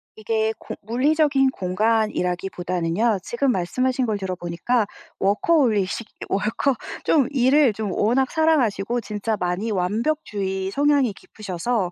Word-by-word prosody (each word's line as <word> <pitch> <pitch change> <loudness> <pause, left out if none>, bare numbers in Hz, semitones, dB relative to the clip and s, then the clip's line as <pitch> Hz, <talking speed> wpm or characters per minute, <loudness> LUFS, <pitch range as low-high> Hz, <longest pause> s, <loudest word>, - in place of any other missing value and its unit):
이게 220 0 0
공 - - -7
물리적인 270 +4 +2
공간이라기보다는요. 185 -1 0
지금 265 +2 0
말씀하신 255 +7 0
걸 215 -3 -1
들어보니까 190 +4 -1 0.3
워커홀리식 215 - +1 0.2
월커 215 +7 0 0.3
좀 280 -6 +3
일을 270 -1 +4
좀 210 -1 -3
워낙 245 +7 +1
사랑하시고 245 -9 +1
진짜 210 +1 -3
많이 180 +5 -1
완벽주의 195 -2 -1
성향이 280 -3 +2
깊으셔서 195 0 -3
220 Hz, 305 characters per minute, -23 LUFS, 190-255 Hz, 0.3 s, 일을